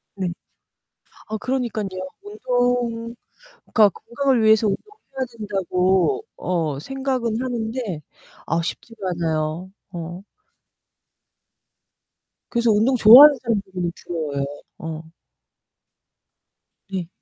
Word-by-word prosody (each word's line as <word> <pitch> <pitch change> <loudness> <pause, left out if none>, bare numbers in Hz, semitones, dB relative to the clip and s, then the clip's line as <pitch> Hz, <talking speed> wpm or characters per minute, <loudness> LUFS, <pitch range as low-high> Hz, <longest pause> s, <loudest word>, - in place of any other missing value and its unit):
네. 190 -2 -2 1.0
아 220 0 -3
그러니깐요. 240 -4 -2 0.3
운동 245 - -1 0.5
그니까 215 -2 +5
건강을 240 +4 -1
위해서 220 0 +5
운동을 420 - -5 0.2
해야 260 - +1
된다고 195 - 0
어 160 -6 -1
생각은 255 - -2
하는데 225 -8 -3 0.4
아 165 +1 0
쉽지가 225 +6 -6
않아요. 165 +1 -2 0.2
어 175 +1 -6 2.3
그래서 235 -1 +2
운동 220 +5 +3
좋아하는 260 +6 +10
사람들이 190 -7 -2
부러워요. 150 -5 -2 0.3
어. 160 0 -6 1.9
네. 185 -3 -4
220 Hz, 210 characters per minute, -22 LUFS, 180-245 Hz, 2.3 s, 좋아하는